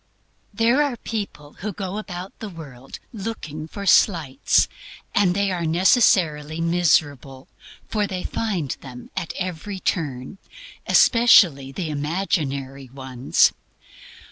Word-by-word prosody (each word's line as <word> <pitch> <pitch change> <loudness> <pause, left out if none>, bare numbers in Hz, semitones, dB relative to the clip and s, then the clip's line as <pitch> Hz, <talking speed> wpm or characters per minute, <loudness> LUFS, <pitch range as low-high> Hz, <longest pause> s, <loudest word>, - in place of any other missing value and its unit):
There 230 +6 +2
are 280 -5 0
people 200 -11 -6
who 210 +2 -4
go 195 +2 -4
about 185 -2 -8
the 220 - -6
world 140 -7 -11 0.2
looking 190 -8 -6
out - - -15
for 200 +4 -7
slights, 165 -7 +3 0.5
and 185 -3 +3
they 200 -1 +1
are 175 -2 -2
necessarily 165 - +3
miserable, 145 -6 0 0.4
for 210 -2 -1
they 185 -2 -5
find 185 - -2
them 125 -2 -11
at 170 - -3
every 185 +1 -5
turn 145 -2 -3 0.5
especially 180 - +5
the 160 +1 -4
imaginary 145 -4 -2
ones. 130 -1 +1
170 Hz, 115 wpm, -22 LUFS, 140-200 Hz, 0.5 s, especially